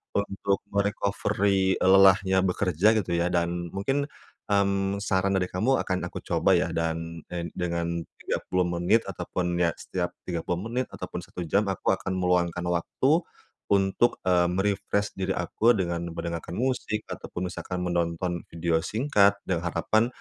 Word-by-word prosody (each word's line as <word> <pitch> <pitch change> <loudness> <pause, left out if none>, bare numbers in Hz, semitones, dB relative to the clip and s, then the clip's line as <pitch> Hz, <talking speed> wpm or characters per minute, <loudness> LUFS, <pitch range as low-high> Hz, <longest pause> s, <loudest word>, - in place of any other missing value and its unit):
untuk 100 -1 0
me 100 - +1
recovery, 100 -1 +1
e - - -2
lelahnya 95 0 +6
bekerja 95 +3 +2
gitu 95 -5 -1
ya. 85 - +2
Dan 85 0 0
mungkin, 135 +9 -1 0.4
mmm, 100 -1 +2
saran 95 -1 +1
dari 90 - +1
kamu 115 +9 +2
akan 95 -1 -2
aku - - -7
coba - - +3
ya, - - 0
dan 85 0 -2
en 85 -1 -3
dengan 85 -1 -2 0.2
30 90 0 -1
menit 85 +6 +2
ataupun 90 -1 -2
ya, 85 -1 +3
setiap 90 -1 -3 0.2
30 90 +3 -3
menit 125 +2 -1
ataupun - - -6
1 - - -8
jam 100 +6 +2
aku 95 - 0
akan 95 0 -4
meluangkan 90 -1 +1
waktu, 130 - +1 0.5
untuk, 100 +4 +2
eee, 90 -1 +4
me 90 +2 0
refresh 100 0 0
diri 95 0 0
aku 110 +7 +3
dengan 85 -3 -1
mendengarkan 85 0 -4
musik 125 -4 -1
ataupun 90 0 -5
misalkan 90 +1 -5
menonton 85 0 -1
video 85 0 +1
singkat, 105 - +3
dengan 85 -2 -1
harapan, 110 +7 +2
95 Hz, 150 wpm, -27 LUFS, 85-100 Hz, 0.5 s, lelahnya